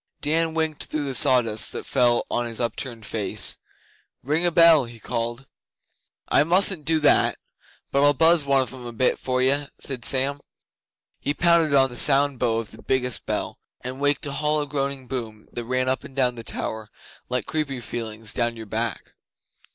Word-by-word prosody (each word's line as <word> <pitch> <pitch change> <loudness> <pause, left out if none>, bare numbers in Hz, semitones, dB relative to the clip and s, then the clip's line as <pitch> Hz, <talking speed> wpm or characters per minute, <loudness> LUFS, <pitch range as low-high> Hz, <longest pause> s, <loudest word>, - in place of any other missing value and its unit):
Dan 160 +2 0
winked 160 -2 -1
through 155 -1 -3
the 135 -2 -3
sawdust 120 -4 +3
that - - -6
fell 120 -3 +2
on 120 0 -1
his 115 -1 -6
upturned 120 -1 -4
face. 105 -1 0 0.7
'Ring 155 +6 +1
a - - +1
bell,' 165 -4 +6
he 115 -1 -12
called. 115 +4 -3 0.8
'I - - +4
mustn't 180 -2 +2
do 160 -1 +2
that, 150 - +3 0.5
but 140 +1 +2
I'll 145 0 +4
buzz 165 +1 +4
one 140 -1 +3
of 130 - -9
'em 125 -2 -9
a 120 - -8
bit 125 +3 +1
for 130 0 -1
you,' 140 +2 +1
said 130 -4 -5
Sam. 135 +5 +2 0.8
He 145 - -2
pounded 170 -4 +3
on 135 -1 +4
the - - -8
sound 140 0 +4
bow 115 -2 +1
of 115 -2 -5
the - - -13
biggest 125 -3 -1
bell, - - -3 0.2
and 130 +2 -7
waked 145 +2 +1
a 140 - -4
hollow 150 +1 0
groaning 140 -1 -3
boom 115 -5 -6
that 120 - -5
ran 130 +1 -1
up 130 0 0
and 135 - -12
down 125 -2 +2
the 115 -1 -9
tower 110 -1 -5 0.4
like 125 0 -2
creepy 145 -4 -3
feelings 110 -2 -3
down 120 -1 0
your 110 - -8
back. 100 - -3
130 Hz, 185 wpm, -23 LUFS, 120-145 Hz, 0.8 s, bell